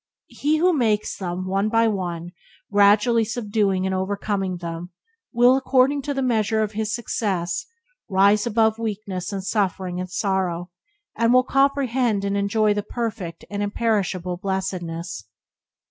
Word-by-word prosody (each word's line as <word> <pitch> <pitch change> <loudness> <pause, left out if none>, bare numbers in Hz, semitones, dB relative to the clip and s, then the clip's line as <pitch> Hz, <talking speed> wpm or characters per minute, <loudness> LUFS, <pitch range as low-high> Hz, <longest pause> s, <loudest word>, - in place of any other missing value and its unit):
He 305 +2 +1
who 355 +3 +3
makes 220 -7 +1
them, 185 -1 -4
one 195 +3 0
by 230 +1 +3
one, 175 -4 -3 0.4
gradually 210 +3 +4
subduing 210 -4 0
and 190 - -1
overcoming 195 0 -2
them, 170 0 -6 0.4
will, 245 +1 +5
according 270 +1 +2
to 285 +1 -3
the 270 - 0
measure 220 -3 +1
of 210 - -3
his 215 0 -2
success, 195 -7 -2 0.4
rise 200 +3 +4
above 220 -1 +2
weakness 205 -4 -4
and 195 -1 -4
suffering 190 -3 -1
and 185 0 -4
sorrow, 185 -2 -1 0.4
and 230 +1 +2
will 255 0 +5
comprehend 260 -6 +1
and 200 0 -1
enjoy 205 +1 +2
the 205 - -1
perfect 210 -6 -5
and 205 0 -4
imperishable 200 -4 -1
blessedness. 175 - -4
205 Hz, 140 wpm, -23 LUFS, 185-230 Hz, 0.4 s, will